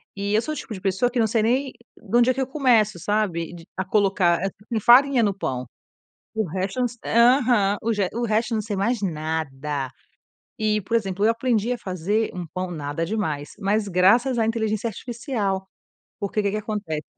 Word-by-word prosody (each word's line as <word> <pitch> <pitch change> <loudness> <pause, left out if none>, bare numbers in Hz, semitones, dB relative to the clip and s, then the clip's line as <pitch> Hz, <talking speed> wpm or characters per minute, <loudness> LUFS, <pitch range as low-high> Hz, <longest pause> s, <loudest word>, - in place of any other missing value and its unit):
E 200 +1 -2
eu 220 - +4
sou 310 - -4
o - - -6
tipo 225 - -6
de 190 - -8
pessoa 195 +5 +1
que 245 - -1
não 220 - +3
sei 220 0 +1
nem 260 +4 +1 0.2
da 225 +2 -1
onde 240 +1 +4
é - - +4
que 265 - -2
eu 260 - -1
começo, 235 - +2
sabe, 175 -4 -1 0.2
a 190 - -1
colocar 190 -4 +2 0.4
farinha 255 +1 +6
no 200 -2 +2
pão. 130 -7 -3 0.7
O 220 -1 0
resto 190 +7 -3
não 245 - +2 0.5
aham, 210 -5 +2 0.4
o 235 +1 -1
resto 225 +2 0
não 215 - 0
sei 205 -1 -4
mais 220 +3 0
nada. 150 -5 -3 0.7
E, 215 -1 +1
por 230 +5 0
exemplo, 200 -2 -1
eu 225 - +5
aprendi 230 -1 0
a 245 - -3
fazer 195 +4 -1
um 180 -2 -5
pão, 185 0 -3
nada 150 0 -3
demais, 160 -8 -2
mas 205 +1 0
graças 230 +8 +3
à 220 - +2
inteligência 220 -1 -1
artificial. 220 -4 -3 0.5
Porque 200 +1 -2
o 210 - +1
que 200 - +1
que 215 - -1
acontece 205 -8 -4
210 Hz, 190 wpm, -23 LUFS, 185-230 Hz, 0.7 s, farinha